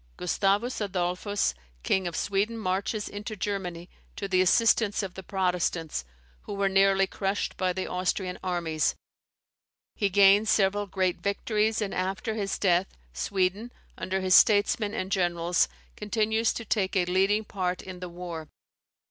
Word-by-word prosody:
Gustavus 200 +7 0
Adolphus, 190 - -1 0.3
King 190 -2 +1
of 170 - -5
Sweden, 205 +4 0
marches 200 +1 -2
into 210 +2 -6
Germany 185 -4 -4 0.3
to 200 - -4
the 185 -1 +3
assistance 220 +1 +3
of 190 -2 -5
the 190 - -8
Protestants, 180 - -1 0.4
who - - -7
ware 200 0 +1
nearly 195 0 +4
crushed 195 +1 -2
by 185 -1 0
the 185 +1 -3
Austrian 180 0 -2
armies. 170 -4 0 1.0
He 200 - 0
gains 200 +2 +5
several 205 0 +2
great 185 -2 0
victories, 215 +2 0
and, 200 - -4
after 195 +4 -2
his 205 -3 -2
death, 180 -1 +2 0.3
Sweden, 195 - -1 0.2
under 190 +1 -2
his 185 0 +2
statesmen 205 +1 +4
and 185 +1 -3
generals, 175 -2 +1 0.3
continues 220 +1 0
to 230 - -6
take 200 -2 0
a 180 -2 +3
leading 195 +4 +2
part 185 -3 -3
in 185 -1 -8
the 180 0 -6
war. 170 -3 -7
195 Hz, 145 wpm, -27 LUFS, 180-205 Hz, 1.0 s, gains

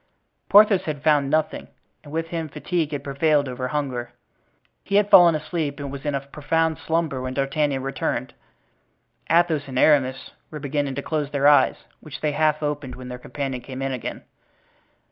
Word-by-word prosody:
Porthos 205 -1 +6
had 145 -2 -4
found 145 -3 +3
nothing, 155 +1 -1 0.4
and 145 - -12
with 165 +1 -3
him 165 -2 -4
fatigue 165 +1 -2
had 145 -2 -4
prevailed 145 +1 +1
over 125 0 -4
hunger. 125 -4 -3 0.7
He 200 - -2
had 205 0 +3
fallen 170 -3 +8
asleep 155 -2 -3
and 140 -1 -5
was 140 0 -8
in 145 - 0
a 135 - -1
profound 155 +3 -1
slumber 160 -5 -1
when 130 0 -4
D'Artagnan 140 -1 0
returned. 135 0 -3 1.0
Athos 165 -3 +2
and 130 -1 -5
Aramis 130 -2 +2 0.2
were 155 - -7
beginning 145 -1 -2
to 140 - -4
close 150 -3 -2
their 140 -1 +2
eyes, 145 0 +5 0.2
which 150 -2 -10
they 150 - 0
half 155 +1 +1
opened 145 -3 -3
when 125 0 -9
their 125 0 -7
companion 135 -1 -5
came 130 +1 -7
in 135 - -1
again. 125 -3 -5
145 Hz, 175 wpm, -23 LUFS, 135-155 Hz, 1.0 s, fallen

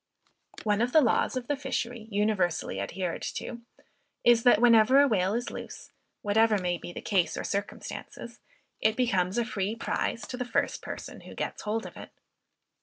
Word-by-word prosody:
One 210 0 +1
of 245 +1 0
the 315 - +7
laws 250 +1 +2
of 245 -1 -4
the 290 - +1
fishery 245 -4 -4
universally 200 - 0
adhered 170 - -3
to, 235 - -5 0.6
is, 240 -1 +6
that 245 -3 +5
whenever 235 +2 +6
a 285 - +6
whale 195 -3 +1
is 240 +1 -2
loose, - - -9 0.3
whatever 215 +1 +3
may 175 -2 -1
be - - -8
the - - -8
case 190 -4 +1
or - - -3
circumstances, 200 +1 -5 0.4
it 220 0 +2
becomes 195 -6 +1
a 235 - +2
free 205 -1 -2
prize 230 0 -2
to 250 - -6
the 250 - -1
first 245 - -1
person - - -7
who - - -11
gets - - -4
hold 220 +2 -2
of - - -10
it. - - -9
220 Hz, 180 wpm, -28 LUFS, 195-240 Hz, 0.6 s, the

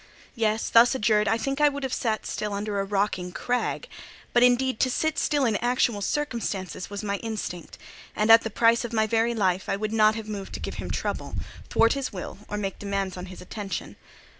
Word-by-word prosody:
Yes, 220 -2 0
thus 235 +3 +6
adjured, 210 -3 +2
I 225 +3 +3
think 275 +4 -2
I 295 - +7
would 285 0 -6
have 265 -1 -2
sat 220 -3 -1
still 210 -1 -3
under 205 0 -2
a - - +1
rocking 195 -2 -1
crag: 245 +6 -2 0.5
but, 240 - +5
indeed, 250 0 +3
to 255 - +3
sit 315 +5 0
still 290 -3 +2
in 220 -4 +2
actual 240 -3 +1
circumstances 210 - -3
was 205 +1 -5
my 200 -1 -1
instinct; 210 -7 -5 0.4
and 215 +1 +3
at 225 0 +9
the 225 - -4
price 230 +2 +3
of 235 -1 -5
my 220 -1 +3
very 230 +2 +1
life, 190 -3 0
I - - +1
would 215 +1 -3
not 215 -1 +4
have 220 -1 -6
moved 200 -2 -6
to - - -4
give - - -5
him - - -6
trouble, - - -3 0.3
thwart 230 - +4
his 275 -2 -3
will, 190 -1 -7
or 210 - -4
make 195 -2 -3
demands 195 -2 -2
on 180 0 -7
his 185 - -10
attention. 200 +1 -5
215 Hz, 215 wpm, -26 LUFS, 200-240 Hz, 0.5 s, at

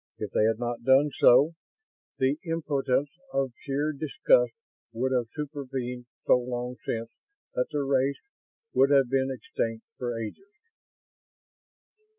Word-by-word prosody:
If - - -5
they 105 - +3
had 110 -1 +2
not 120 0 -3
done 135 +4 +5
so, 135 +6 +7 0.7
the 135 +3 +1
impotence 145 -4 0 0.2
of 135 -2 0
sheer 145 +2 -1
disgust 470 - +3 0.4
would 130 +3 -1
have 125 -3 +1
supervened 130 -4 -5 0.2
so 125 - +5
long 125 0 -4
since 115 0 -3 0.4
that 125 - 0
the 145 -1 -1
race 135 0 +1 0.6
would 135 - +5
have 135 -3 +4
been 135 0 +2
extinct 115 -3 -3
for 120 -2 -2
ages. 115 - -7
130 Hz, 130 wpm, -28 LUFS, 125-145 Hz, 0.7 s, so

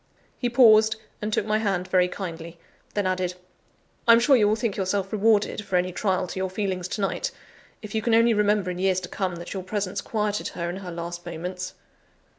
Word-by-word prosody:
He 245 - 0
paused, 220 -3 +6 0.3
and 210 +1 -2
took 205 - 0
my 215 0 +1
hand 195 -4 -1
very 180 -1 +3
kindly; 170 -3 -7 0.4
then 205 -2 0
added: 185 -1 -1 0.7
"I 230 - +9
am 230 - +6
sure 270 +3 +5
you 215 -4 +4
will 210 - +3
think 220 -2 -2
yourself 195 0 -1
rewarded 215 0 +2
for 195 -2 -3
any 180 +1 +2
trial 185 0 0
to 185 - -6
your 190 0 -1
feelings 185 -2 -2
to 205 +2 -4
night, 195 - -1 0.5
if 210 - -8
you 220 - 0
can 225 0 +2
only 230 0 +5
remember 205 -3 +2
in 180 - -6
years 190 -1 +2
to 180 - -7
come, 185 -3 -2
that 170 +1 -7
your 190 - -3
presence 195 0 -3
quieted 210 -2 -2
her 170 - -4
in 180 - -6
her 190 -2 -7
last 170 0 -6
moments!" 180 +2 -5
195 Hz, 215 wpm, -25 LUFS, 180-215 Hz, 0.7 s, I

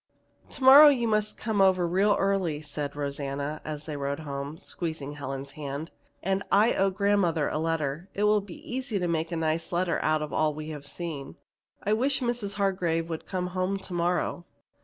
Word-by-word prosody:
"Tomorrow 275 +3 +9
you 250 -5 +3
must 215 -1 0
come 215 -3 0
over 185 -2 +4
real 195 +4 +3
early," 195 -6 0
said 145 -1 -4
Rosanna 140 +1 -3
as 150 -1 -5
they 155 -1 -5
rode 140 +1 -3
home, 140 0 -5
squeezing 160 -6 -4
Helen's 135 -1 -6
hand. 145 +1 -6 0.3
"And 195 +1 0
I 210 +4 +5
owe 195 0 +2
grandmother 190 -5 +1
a - - -2
letter. 160 +1 -2
It 205 - 0
will 210 0 +4
be 195 -3 -12
easy 250 -3 -2
to 180 -2 -1
make 165 0 -1
a 170 - -2
nice 160 0 -1
letter 175 0 +1
out 155 0 +1
of 150 - -6
all 155 -1 +1
we 155 0 -6
have 145 -2 -7
seen. 150 - -5 0.5
I 210 - +1
wish 265 +5 +2
Mrs. 235 -6 -2
Hargrave 180 -5 0
would 160 - -5
come 180 -1 -2
home 185 +1 0
to 195 -1 -8
morrow." 175 0 -1
170 Hz, 185 wpm, -27 LUFS, 150-200 Hz, 0.5 s, Tomorrow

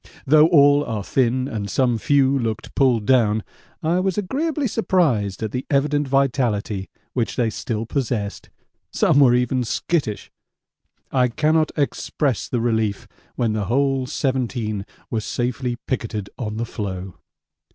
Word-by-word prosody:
Though 155 +2 +6
all 145 -3 +5
are 110 -6 -3
thin 130 +3 +1
and 105 -5 -4
some 120 0 +1
few 140 +2 +3
looked 115 -3 -3
pulled 125 -6 +2
down 110 -4 +3 0.4
I 170 +3 +2
was 190 +1 -1
agreeably 280 - -1
surprised 145 - +1
at 110 - -2
the 125 +3 -3
evident 145 +1 +1
vitality 120 -7 0 0.2
which 120 -3 -1
they 115 -3 +1
still 110 0 -3
possessed 115 -5 -3 0.4
some 140 - +3
were 125 -4 +6
even 125 +1 +1
skittish. 120 -2 -2 0.8
I 125 -1 +3
cannot 155 +5 +1
express 145 -1 -1
the 120 - 0
relief 110 -4 0 0.3
when 115 -3 0
the 105 -2 -1
whole 135 +3 +1
seventeen 120 -7 -2 0.2
were 110 - 0
safely 125 +2 -2
picketed 110 -5 -3
on 110 -3 -4
the 115 - -1
floe. 95 -5 -5
125 Hz, 140 wpm, -22 LUFS, 110-140 Hz, 0.8 s, Though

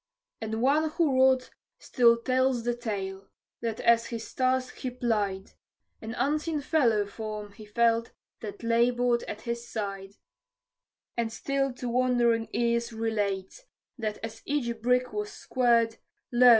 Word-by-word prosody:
And 220 +1 -2
one 305 +4 +3
who 310 -3 +1
wrought 260 -1 +4 0.3
still 235 -2 +4
tells 255 0 +1
the 240 +1 +1
tale, 195 -5 -4 0.3
that 225 -2 -2
as 235 0 +4
his 230 -2 -6
task 255 0 0
he 255 - -3
plied, 210 -6 -1 0.5
An 225 +1 -5
unseen 305 +3 0
fellow 240 -9 +2
form 210 0 -6
he 215 +1 -12
felt 230 +2 +2 0.3
that 205 0 -8
labored 240 +1 +3
at 210 - -6
his 235 0 -4
side; 195 -2 -4 1.0
And 230 -1 -1
still 275 +3 -1
to 250 0 -6
wondering 240 -2 +2
ears 235 0 +1
relates, 220 - -2 0.3
that 215 -4 -3
as 225 0 -6
each 235 -6 -1
brick 250 +1 +2
was 420 0 -3
squared, 235 -3 +2 0.3
Lo! 250 +1 +7
235 Hz, 135 wpm, -28 LUFS, 220-255 Hz, 1.0 s, Lo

